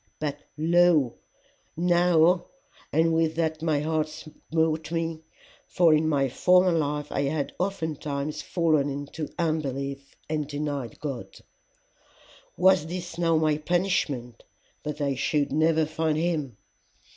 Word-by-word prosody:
But 145 -1 -3 0.2
lo, 165 -5 +4 0.6
now 175 0 +3 0.5
And 165 +2 +3
with 160 -1 +1
that 160 -1 -1
my 155 -3 +1
heart 155 0 0
smote 160 +1 -2
me, 165 -1 -2 0.5
for 170 -3 +4
in 155 +1 +2
my 140 -3 +2
former 180 +7 +4
life 150 -2 -1
I - - 0
had 140 0 -2
oftentimes 155 -6 -3
fallen 155 -5 +1
into 145 +2 -5
unbelief 140 -4 -2
and 150 -2 -2
denied 145 -5 -4
God: 140 -5 -6 1.2
was 180 -3 +4
this 175 0 -6
now 165 -2 +3
my 155 -1 +1
punishment 155 -8 -1 0.4
that 150 0 -5
I 140 -1 +1
should 145 +2 0
never 160 +2 +3
find 155 0 -1
him? 155 -8 -1
155 Hz, 120 wpm, -26 LUFS, 145-165 Hz, 1.2 s, lo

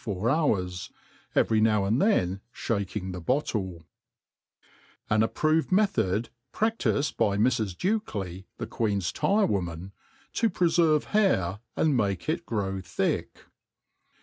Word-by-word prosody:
four 105 +1 -1
hours; 95 - 0 0.5
every 110 -1 +3
now 105 -2 +3
and 110 +7 +1
then 95 - +2
fhaking 100 -4 -3
the 90 -1 -6
bottle. 95 - -1 1.3
An 110 0 +4
approved 155 +9 +1
Method 120 - +2 0.2
praSiifed 220 -10 0
hy 100 - -1
Mrs. 110 -4 +1
Dukely^ 100 - -2
the - - -4
^eeris 100 -5 -1
Tyro^ 205 +1 +2
IVomany 90 -2 -3 0.4
to 230 - +2
prefervt 165 -4 +3
Hairy 105 - +1 0.2
and 155 -3 +2
make 100 -5 0
it 170 +2 -2
grow 95 -4 -2
thick. 90 - -2
110 Hz, 120 wpm, -27 LUFS, 95-155 Hz, 1.3 s, An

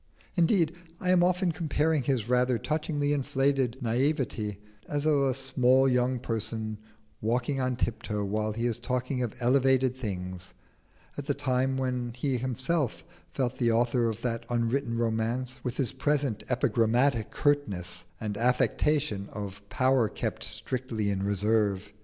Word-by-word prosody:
Indeed, 170 -2 +3 0.2
I 180 - +1
am 180 -1 +5
often 180 0 +2
comparing 155 -1 +1
his 125 -4 0
rather 125 0 +3
touchingly 145 +2 -1
inflated 135 -2 +1
naïveté 120 -4 0 0.3
as 145 0 -1
of 155 -1 +4
a 135 -1 +2
small 130 0 +3
young 125 0 +2
person 110 -2 -3 0.4
walking 125 +5 0
on 130 0 0
tiptoe 105 -3 -2
while 110 +2 -1
he 115 +2 -2
is 120 -1 +1
talking 125 +1 -2
of 120 -4 -2
elevated 130 0 +3
things, 95 -6 -5 0.6
at 145 - -6
the 145 - +1
time 130 0 0
when 125 -2 -2
he 130 +1 -1
felt - - -8
himself 130 +2 -1 0.3
the 125 -2 +1
author 120 +1 +2
of 110 +1 -6
that 115 -2 -1
unwritten 120 +1 0
romance, 120 +3 -1
with 125 -1 -3
his 135 -4 +1
present 145 -6 0
epigrammatic 120 -1 +2
curtness 95 - -1
and 105 -2 -3
affectation 125 -1 +1
of 100 -1 -6
power 130 -3 +3
kept - - -3
strictly 120 -5 -2
in 95 -1 -1
reserve. 100 0 +1
125 Hz, 140 wpm, -28 LUFS, 110-135 Hz, 0.6 s, am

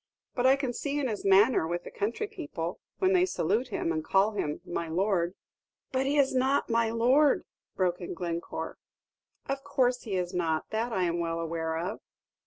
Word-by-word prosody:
But 250 0 +2
I 265 - +7
can 270 -3 -2
see 285 +3 -2
in 275 - 0
his 215 -4 -3
manner 195 -1 +5
with 175 +1 -2
the - - -9
country 230 - -2
people, 295 - -5 0.2
when 375 0 +3
they 365 -1 +5
salute 230 - 0
him, 200 -7 -2
and 155 -1 -1
call 195 +5 +3
him 150 -8 -2
'my 170 -1 -3
lord' 180 +1 0 0.3
" - - -59
"But 265 0 0
he 290 +2 +1
is 275 -2 +4
not 260 0 +2
'my 230 0 +3
lord,'" 255 +6 +3 0.3
broke 180 -1 0
in 175 - -5
Glencore. 170 -1 -4 0.7
"Of 275 0 -2
course 255 -3 +1
he 205 -5 -4
is 180 0 -2
not; 165 -3 0
that 225 +2 -1
I 190 -4 +1
am 170 -1 0
well 165 0 -1
aware 160 -1 -2
of." 185 +6 -3
210 Hz, 195 wpm, -29 LUFS, 175-260 Hz, 0.7 s, I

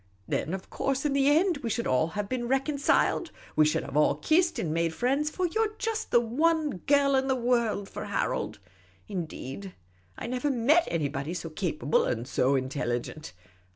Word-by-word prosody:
Then, 170 - -1
of 190 - -10
course, 270 +1 -1
in 290 - +1
the 275 0 +3
end, 335 +3 +3
we 255 -5 -4
should 230 +2 -1
all 130 +4 +2
have 205 -1 -1
been 245 0 -2
reconciled; 280 +5 +1 0.3
we 155 - +5
should 155 - +1
have 150 0 +1
kissed 335 +2 +3
and 155 -3 -1
made 165 0 0
friends: 275 - +1
for 365 +4 -2
you 405 +6 0
're 425 -1 -3
just 450 -1 -2
the 240 - +5
one 300 - +1
girl 280 -1 +4
in 265 0 +1
the 265 - +2
world 235 -5 0
for - - -6
Harold; - - -2 0.5
indeed, 180 -1 -6 0.4
I - - -6
never 250 +4 -1
met 280 +7 +3
anybody 150 0 -2
so 165 -2 -5
capable 155 -4 0
and 120 +1 -2
so 135 +1 +2
intelligent. 130 -1 -3
240 Hz, 180 wpm, -28 LUFS, -, 0.5 s, we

